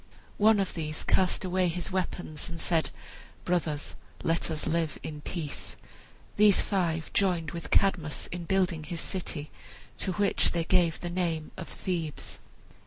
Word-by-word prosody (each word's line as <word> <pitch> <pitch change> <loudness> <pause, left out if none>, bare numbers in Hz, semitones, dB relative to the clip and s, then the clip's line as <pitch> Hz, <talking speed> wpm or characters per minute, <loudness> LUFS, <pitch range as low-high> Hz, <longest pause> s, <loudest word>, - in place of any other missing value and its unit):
One 215 0 +6
of 195 - 0
these 155 -2 -3
cast 185 0 +2
away 185 0 +2
his 175 +1 -2
weapons 180 -4 -2
and 170 0 -6
said, 165 0 +1 0.6
"Brothers, 160 -5 0 0.3
let 165 +1 +1
us 155 -2 -3
live 165 -1 0
in 150 -1 -5
peace!" 155 -2 -4 0.6
These 205 -2 +7
five 170 -5 0
joined 175 -6 +2
with 170 -3 -6
Cadmus 175 -6 +2
in 175 -1 -4
building 175 -4 +1
his 170 +2 -4
city, 165 -5 -3 0.5
to 190 - 0
which 200 +2 +3
they 170 -1 +1
gave 170 -1 +3
the 175 - -3
name 170 -3 -1
of 185 - -6
Thebes. 165 -5 -3
170 Hz, 150 wpm, -29 LUFS, 160-185 Hz, 0.6 s, These